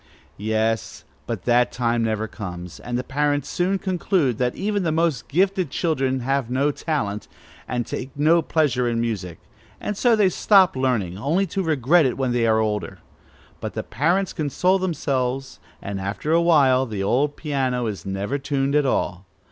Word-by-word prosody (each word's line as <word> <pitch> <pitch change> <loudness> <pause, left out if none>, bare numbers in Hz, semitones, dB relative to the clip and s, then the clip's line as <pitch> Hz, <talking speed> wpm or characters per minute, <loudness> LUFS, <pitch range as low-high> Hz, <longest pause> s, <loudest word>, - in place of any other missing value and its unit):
Yes; 110 +1 -1 0.2
but - - -4
that 120 0 +3
time 120 -1 0
never 110 -1 -1
comes, 90 -5 -8
and 120 0 -3
the 125 - -2
parents 145 +1 0
soon 185 +2 0
conclude 180 - 0
that 125 -1 0
even 205 0 -1
the 165 -3 0
most 155 -8 0
gifted 185 +1 +1
children 135 -4 0
have 135 -1 -1
no 135 +4 +1
talent, 120 -10 -3 0.4
and 120 -1 -2
take 130 - -5
no 160 +3 +4
pleasure 135 -6 +1
in 115 -1 -1
music; 100 -8 -3 0.4
and 210 - -3
so 235 +3 +3
they 205 -3 +4
stop 190 -1 +4
learning, 115 -9 -1
only 165 - +1
to 190 +2 -3
regret 155 -1 +3
it 125 - -3
when 130 -2 0
they 120 -1 +1
are 110 0 +3
older. 105 -2 -1 0.6
But - - -6
the - - -2
parents 175 - 0
console 180 +6 +1
themselves, 135 -7 -2 0.2
and 100 -1 -4
after 100 +10 -3
a 165 +1 +4
while 135 -6 +4
the 105 -3 -3
old 140 +8 +1
piano 130 -5 -1
is 105 -3 -4
never 100 +8 -3
tuned 140 0 -1
at 145 -2 +3
all. 95 -6 -1
135 Hz, 170 wpm, -23 LUFS, 115-160 Hz, 0.6 s, no